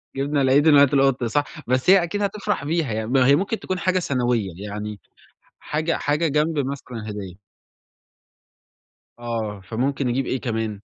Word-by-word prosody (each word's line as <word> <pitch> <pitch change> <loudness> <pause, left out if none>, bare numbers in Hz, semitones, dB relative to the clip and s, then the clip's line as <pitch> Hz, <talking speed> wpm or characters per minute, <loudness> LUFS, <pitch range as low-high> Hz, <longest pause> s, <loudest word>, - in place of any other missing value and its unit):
جِبنا 140 +1 0
العيد 135 +3 +4
مات 145 -1 +6
القُط، 135 -2 +3
صح، 130 +6 +1 0.2
بس 130 +7 +1
هي 190 -2 +7
أكيد 205 +5 -3
هتفرح 200 -4 -2
بيها 155 -3 -1
يعني، 110 0 -3
ما 130 +1 +3
هي 140 - +6
ممكن 200 +6 -1
تكون 185 -1 -3
حاجة 185 +1 +1
ثانوية 125 - 0
يعني 105 +1 -6 0.6
حاجة 155 +2 -2
حاجة 150 +3 0
جنب 150 +2 0
مثلًا 130 -5 -5
هدية. 100 -4 -7 1.8
آه، 115 -3 -4
فممكن 130 +7 -2
نجيب 125 +2 0
إيه 130 - -2
كمان؟ 110 -4 -3
135 Hz, 155 wpm, -23 LUFS, 115-150 Hz, 1.8 s, هي